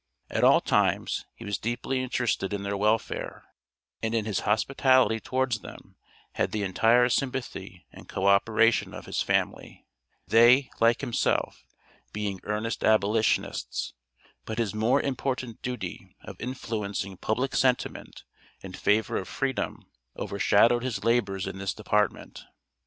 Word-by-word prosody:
At - - 0
all - - +6
times - - 0
he - - -11
was 100 -1 -2
deeply 120 +3 -2
interested 120 -5 -1
in 100 -1 -3
their 100 0 -2
welfare, 105 +3 -1 0.6
and 110 +1 -1
in 110 -2 0
his 105 -3 -1
hospitality 125 +1 +3
towards 130 -1 -1
them, - - -12 0.4
had - - -1
the 105 -1 -2
entire 115 +6 +4
sympathy 120 - -3
and - - -14
co 95 - -3
operation 110 +3 +3
of - - -9
his - - -2
family, - - -2 0.4
they, 120 +4 +5
like 115 0 +3
himself, 120 - -1 0.5
being 105 -2 -3
earnest 105 +2 -2
abolitionists, 110 0 +1 0.5
but 110 - -6
his 115 -4 -1
more 110 +4 +2
important 130 -4 -3
duty 125 -1 -6
of - - -10
influencing 105 -6 -4
public 125 +8 -1
sentiment 130 -2 -1 0.4
in - - -9
favor 105 0 +1
of 95 - -4
freedom, 135 -1 -3 0.3
overshadowed 110 +4 +3
his 125 -2 -3
labors 115 -5 +1
in 95 - -6
this 95 -1 -3
department. 105 -1 -1
110 Hz, 135 wpm, -27 LUFS, 105-125 Hz, 0.6 s, all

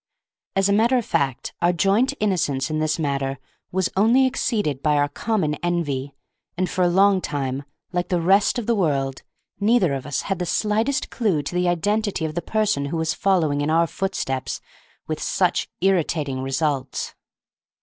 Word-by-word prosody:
As 195 0 +3
a 200 - +2
matter 230 +5 +4
of 240 - -1
fact, 135 -3 -1
our 175 +1 +4
joint 200 +8 +2
innocence 155 -9 0
in 155 - 0
this 155 0 0
matter 140 -3 -1 0.3
was 185 0 +1
only 230 +7 +4
exceeded 210 - -1
by 150 0 +2
our 145 0 +3
common 160 0 -1
envy, 145 -6 -2 0.4
and 185 0 +1
for 185 - -2
a 180 - +5
long 190 +2 +4
time, 135 -3 -2 0.3
like 175 -1 -1
the 180 -2 +1
rest 195 +7 +3
of 240 - -2
the 235 - +2
world, 140 -9 0 0.4
neither 205 -6 +3
of 135 0 -4
us 145 - -2
had 195 -2 -2
the 180 - -1
slightest 220 +9 0
clew 195 - 0
to 145 - -5
the 180 0 +1
identity 205 +1 0
of 155 - -3
the 175 - -2
person 210 -10 0
who 150 +4 -3
was 160 0 0
following 160 -7 +1
in 145 - 0
our 165 +1 +3 0.2
steps 135 -8 -3 0.5
with - - -3
such - - +1
irritating 155 -8 +1
results. 135 0 -2
175 Hz, 175 wpm, -23 LUFS, 145-200 Hz, 0.5 s, a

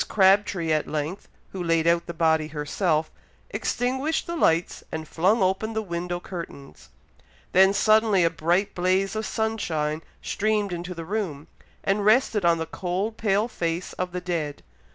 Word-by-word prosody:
Crabtree 190 -4 +3
at 155 -1 +1
length, 155 +5 -4 0.2
who 185 -2 -4
laid 165 -1 +2
out 170 0 +2
the 170 - -4
body 160 -1 +2
herself, 155 +2 -1 0.4
extinguished 265 +6 -1
the 340 - -4
lights, 165 - +1
and 160 0 -5
flung 190 +8 +2
open 190 +4 0
the 220 - -1
window 175 -1 -3
curtains. 170 - -9 0.6
Then 190 +1 +6
suddenly 215 -1 +4
a 165 - +3
bright 175 +5 0
blaze 185 +3 +1
of 220 0 -2
sunshine 160 -9 -1 0.2
streamed 210 -2 0
into 175 +1 -5
the 165 -1 -6
room, 175 -7 -3 0.4
and 200 +1 +1
rested 215 -1 +3
on 170 -1 +4
the 160 - -2
cold 185 +6 -3
pale 210 0 +1
face 170 -5 -3
of 180 0 -3
the 180 0 -4
dead. 165 -5 -3
180 Hz, 155 wpm, -25 LUFS, 165-210 Hz, 0.6 s, Then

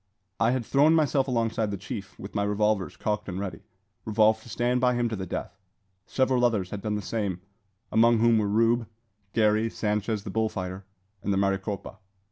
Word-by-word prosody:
I 115 - +3
had 125 -1 0
thrown 150 +6 +4
myself 145 -3 +2
alongside 115 -3 0
the 100 - -3
chief, 100 0 -7
with 100 - -9
my 100 - 0
revolvers 105 -1 0
cocked 105 -1 -2
and 90 +1 -4
ready, 100 -1 -5 0.4
resolved 110 0 +3
to 120 - -14
stand 125 +2 0
by 125 -1 +3
him 120 0 +1
to 110 - -3
the 95 -2 -5
death. 95 +2 -5 0.5
Several 130 -2 +1
others 105 -7 +1
had 105 - -5
done 105 0 -2
the 105 - -3
same, 100 -3 -2 0.5
among 115 +1 +5
whom 115 0 +4
were 105 - 0
Rube, 115 +2 +2 0.5
Garey, 110 0 +3
Sanchez 105 -1 -1
the 100 - -6
bull 110 +1 +1
fighter, 95 -1 -5 0.4
and 100 - -1
the 95 - +1
Maricopa. 100 +1 -2
110 Hz, 190 wpm, -27 LUFS, 100-115 Hz, 0.5 s, among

